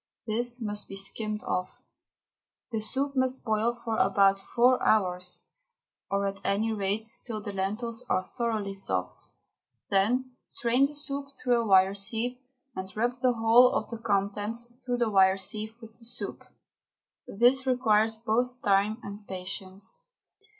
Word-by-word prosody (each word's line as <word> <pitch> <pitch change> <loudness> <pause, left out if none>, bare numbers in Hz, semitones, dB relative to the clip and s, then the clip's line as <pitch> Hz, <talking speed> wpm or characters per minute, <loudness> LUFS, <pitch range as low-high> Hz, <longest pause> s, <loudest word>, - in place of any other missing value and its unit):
This 240 +2 -1
must 210 -2 -3
be 195 - -8
skimmed 210 +2 -3
off. 180 0 -3 0.9
The 225 - -1
soup 275 +5 -1
must 260 0 0
boil 230 +1 0
for 225 -1 -1
about 195 0 +4
four 245 +5 +3
hours, 180 -4 +1 0.7
or 200 0 0
at 195 0 -3
any 220 +3 +1
rate 205 +1 -1 0.2
till 225 -3 -4
the 205 -1 -6
lentils 220 +5 -2
are 185 - +2
thoroughly 220 -5 -2
soft. 90 - -1 0.7
Then 245 +6 +1
strain 245 +3 +2
the 295 - -8
soup 280 -1 -3 0.2
through 245 -2 +3
a 230 - -3
wire 190 0 +5
sieve, 225 +5 -1 0.4
and 190 0 -5
rub 240 +3 0
the 250 -1 +3
whole 230 +2 +6
of - - -2
the 230 - -5
contents 205 +2 -1 0.2
through 245 -1 -1
the 235 -2 +1
wire 190 -1 +5
sieve 215 +3 -3
with 225 -2 -12
the 230 +1 -10
soup. 235 - -4 0.8
This 250 +5 +3
requires 220 -3 +3
both 245 +3 -1
time 200 +2 +3
and 200 +1 -9
patience. 190 - -5
220 Hz, 150 wpm, -28 LUFS, 195-245 Hz, 0.9 s, whole